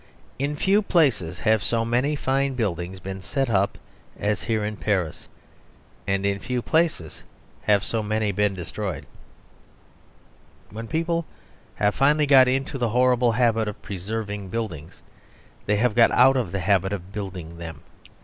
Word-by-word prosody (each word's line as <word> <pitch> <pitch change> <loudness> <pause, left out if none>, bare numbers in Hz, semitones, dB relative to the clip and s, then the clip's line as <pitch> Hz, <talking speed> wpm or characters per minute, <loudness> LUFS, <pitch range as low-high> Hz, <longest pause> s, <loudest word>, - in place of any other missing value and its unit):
In 140 +2 -1
few 195 +7 +3
places 125 - +1
have 110 -2 +2
so 115 +1 0
many 125 +6 +1
fine 135 0 0
public - - -9
buildings 95 -4 -2
been 95 +1 -7
set 125 +7 -1
up 100 -1 +1 0.4
as 105 0 0
here 110 -2 -1
in 105 0 -3
Paris, 95 -7 -2 0.8
and 95 0 0
in 100 0 0
few 125 +2 -3
places 160 - 0 0.4
have 100 -2 +3
so 115 - -2
many 110 0 0
been 100 0 0
destroyed. 95 -1 -5 1.7
When 115 +2 -7
people 165 +2 -1 0.5
have 105 0 +1
finally 150 +2 +3
got 135 -2 +7
into 135 +2 -1
the 120 -2 +1
horrible 125 0 +3
habit 115 -2 +2
of 105 - -5
preserving 100 +1 -5
buildings, 90 -8 -5 0.6
they 105 - +3
have 115 +2 +2
got 115 0 +6
out 130 +2 +5
of 120 -9 -1
the 100 - -2
habit 95 +1 +2
of 95 -1 -6
building 90 -5 -6
them. 80 -3 -8
110 Hz, 155 wpm, -24 LUFS, 95-125 Hz, 1.7 s, got